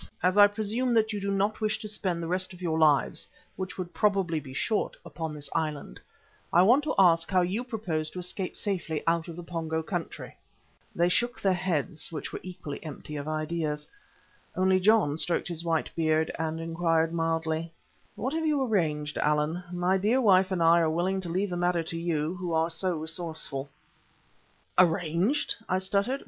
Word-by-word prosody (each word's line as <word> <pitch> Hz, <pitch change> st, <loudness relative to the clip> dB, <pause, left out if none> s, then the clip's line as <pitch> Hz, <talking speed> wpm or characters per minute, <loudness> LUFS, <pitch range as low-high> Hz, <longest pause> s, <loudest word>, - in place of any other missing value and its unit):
Now, 180 Hz, -, +5 dB
as 185 Hz, -, -3 dB
I 205 Hz, -, +10 dB
presume 220 Hz, +4 st, -1 dB
that 220 Hz, -1 st, +2 dB
you 205 Hz, -, -3 dB
do 200 Hz, -, -2 dB
not 200 Hz, +3 st, 0 dB
wish 215 Hz, 0 st, +1 dB
to 220 Hz, -1 st, -7 dB
spend 185 Hz, -5 st, -2 dB
the -, -, -3 dB
rest 185 Hz, +2 st, -1 dB
of 180 Hz, -, -13 dB
your 160 Hz, -3 st, 0 dB
lives, 150 Hz, -3 st, +3 dB, 0.3 s
which 190 Hz, 0 st, -5 dB
would 180 Hz, -2 st, -5 dB
probably 195 Hz, -6 st, +1 dB
be 140 Hz, -3 st, -10 dB
short, 210 Hz, -, -1 dB
upon 160 Hz, -2 st, -5 dB
this 145 Hz, -1 st, -4 dB
island, 150 Hz, -, -3 dB, 0.5 s
I 175 Hz, -, +6 dB
want 250 Hz, +9 st, +5 dB
to -, -, -1 dB
ask 170 Hz, -3 st, +5 dB
how 185 Hz, -2 st, +3 dB
you 190 Hz, +7 st, -1 dB
propose 185 Hz, -11 st, -3 dB
to 180 Hz, -, -7 dB
escape 180 Hz, +1 st, -4 dB
safely 175 Hz, -7 st, -2 dB
out 165 Hz, -1 st, +1 dB
of 170 Hz, -, -7 dB
the 175 Hz, -, -7 dB
Pongo 160 Hz, -1 st, -3 dB
country?" 175 Hz, 0 st, -5 dB, 0.6 s
They 170 Hz, +1 st, +3 dB
shook 240 Hz, +7 st, 0 dB
their 195 Hz, -2 st, +2 dB
heads, 175 Hz, -3 st, -1 dB
which 155 Hz, -, -6 dB
were -, -, -4 dB
evidently 175 Hz, -6 st, -8 dB
empty 150 Hz, -1 st, -8 dB
of 145 Hz, 0 st, -5 dB
ideas. 155 Hz, -1 st, -2 dB, 0.7 s
Only 185 Hz, 0 st, +3 dB
John 185 Hz, -7 st, +3 dB
stroked 175 Hz, -, +2 dB
his 170 Hz, -1 st, -4 dB
white 165 Hz, -2 st, 0 dB
beard, 160 Hz, -1 st, +1 dB
and 160 Hz, 0 st, -2 dB
inquired 165 Hz, 0 st, +1 dB
mildly: 165 Hz, 0 st, -1 dB, 0.4 s
"What 260 Hz, +6 st, -3 dB
have 320 Hz, 0 st, 0 dB
you 290 Hz, -3 st, +2 dB
arranged, 155 Hz, -, 0 dB
Allan? 150 Hz, +4 st, +1 dB
My 180 Hz, +2 st, +1 dB
dear 220 Hz, +7 st, +2 dB
wife 190 Hz, -5 st, +5 dB
and 180 Hz, -3 st, +1 dB
I 165 Hz, +1 st, +6 dB
are -, -, +3 dB
quite 155 Hz, 0 st, 0 dB
willing 190 Hz, +3 st, 0 dB
to 175 Hz, -, -4 dB
leave 190 Hz, +3 st, -1 dB
the 175 Hz, -, -2 dB
matter 175 Hz, -1 st, +1 dB
to 165 Hz, +1 st, -3 dB
you, 165 Hz, -1 st, -1 dB
who 180 Hz, -2 st, -3 dB
are 160 Hz, +1 st, +2 dB
so 175 Hz, +1 st, -1 dB
resourceful." 160 Hz, -3 st, -3 dB, 1.1 s
"Arranged!" 175 Hz, -, +2 dB, 0.2 s
I 185 Hz, -, +2 dB
stuttered. 200 Hz, +8 st, 0 dB
175 Hz, 190 wpm, -28 LUFS, 160-195 Hz, 1.1 s, I